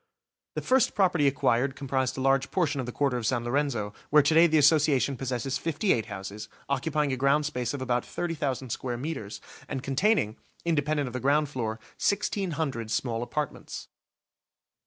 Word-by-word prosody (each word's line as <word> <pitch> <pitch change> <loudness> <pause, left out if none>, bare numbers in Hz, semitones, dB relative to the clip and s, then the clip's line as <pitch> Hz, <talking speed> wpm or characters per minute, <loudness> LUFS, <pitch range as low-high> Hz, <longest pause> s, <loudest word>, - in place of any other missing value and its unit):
The - - -3
first 260 -1 +3
property 180 -7 +3
acquired 135 0 +1
comprised 130 -1 -1
a - - -2
large 135 0 +2
portion 155 -6 0
of 125 - -3
the - - -3
Quarter 135 -1 0
of 120 - -4
San 120 -1 0
Lorenzo, 120 -5 -1 0.2
where 150 0 +6
to 150 - +3
day 165 +2 +7
the 160 -1 +3
Association 145 -2 +4
possesses 130 +1 -2
fifty 165 +6 +1
eight 115 -2 -2
houses, 100 0 -7 0.2
occupying 145 +1 0
a - - +1
ground 140 +3 +2
space 125 -5 -2
of 135 - -4
about 125 -1 0
30,000 140 -7 -3
square 120 +1 -3
metres, 130 -7 -5 0.3
and 135 -2 -4
containing, 135 - +1 0.3
independent 150 -3 +1
of 125 - -6
the 125 - -2
ground 145 +3 +2
floor, 115 -6 -2 0.3
1,600 160 - -1
small 115 0 -1
apartments. 145 +4 -4
135 Hz, 170 wpm, -28 LUFS, 125-150 Hz, 0.3 s, day